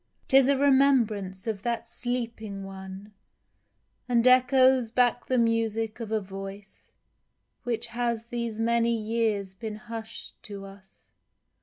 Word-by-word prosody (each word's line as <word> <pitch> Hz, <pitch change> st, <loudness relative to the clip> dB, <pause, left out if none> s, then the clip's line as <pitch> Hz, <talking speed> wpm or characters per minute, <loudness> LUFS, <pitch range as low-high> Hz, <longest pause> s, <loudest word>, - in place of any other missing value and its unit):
'Tis 270 Hz, -1 st, +6 dB
a 280 Hz, -, +4 dB
remembrance 245 Hz, -9 st, +2 dB
of 220 Hz, -4 st, -3 dB
that 235 Hz, +1 st, -2 dB
Sleeping 230 Hz, -5 st, -4 dB
One, 195 Hz, +1 st, -9 dB, 1.0 s
And 235 Hz, -1 st, +3 dB
echoes 255 Hz, -1 st, +5 dB
back 245 Hz, +1 st, +1 dB
the 255 Hz, -, +1 dB
music 225 Hz, -1 st, 0 dB
of 225 Hz, -2 st, -6 dB
a 220 Hz, -, +2 dB
voice 195 Hz, 0 st, -10 dB, 0.7 s
Which 240 Hz, -2 st, -1 dB
has 235 Hz, -1 st, -1 dB
these 235 Hz, -2 st, -4 dB
many 235 Hz, 0 st, +2 dB
years 215 Hz, -3 st, -1 dB
been 215 Hz, +2 st, -6 dB
hush'd 230 Hz, 0 st, -9 dB
to 200 Hz, -2 st, -8 dB
us 195 Hz, 0 st, -16 dB
230 Hz, 125 wpm, -27 LUFS, 205-245 Hz, 1.0 s, Tis